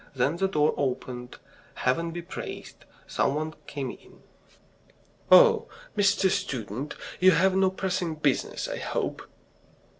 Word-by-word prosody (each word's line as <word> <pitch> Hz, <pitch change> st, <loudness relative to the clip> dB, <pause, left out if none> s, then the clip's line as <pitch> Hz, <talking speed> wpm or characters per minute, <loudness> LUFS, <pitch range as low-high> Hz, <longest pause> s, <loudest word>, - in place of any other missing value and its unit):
Then 135 Hz, +6 st, +1 dB
the 195 Hz, +2 st, +1 dB
door 150 Hz, -5 st, +2 dB
opened. 125 Hz, -2 st, -3 dB, 0.4 s
Heaven 165 Hz, +7 st, 0 dB
be 170 Hz, +1 st, -6 dB
praised! -, -, -8 dB, 0.2 s
Some 140 Hz, -, 0 dB
one 155 Hz, +1 st, -3 dB
came 135 Hz, -3 st, -4 dB
in. -, -, -17 dB, 1.1 s
"Oh, -, -, +7 dB, 0.3 s
Mr. 200 Hz, -1 st, +3 dB
Student, 125 Hz, +3 st, -3 dB, 0.2 s
you 185 Hz, -, +7 dB
have 185 Hz, +2 st, +4 dB
no 190 Hz, 0 st, +4 dB
pressing 185 Hz, -3 st, -2 dB
business, 150 Hz, -3 st, 0 dB
I -, -, -4 dB
hope?" -, -, -3 dB
155 Hz, 125 wpm, -27 LUFS, 135-185 Hz, 1.1 s, Oh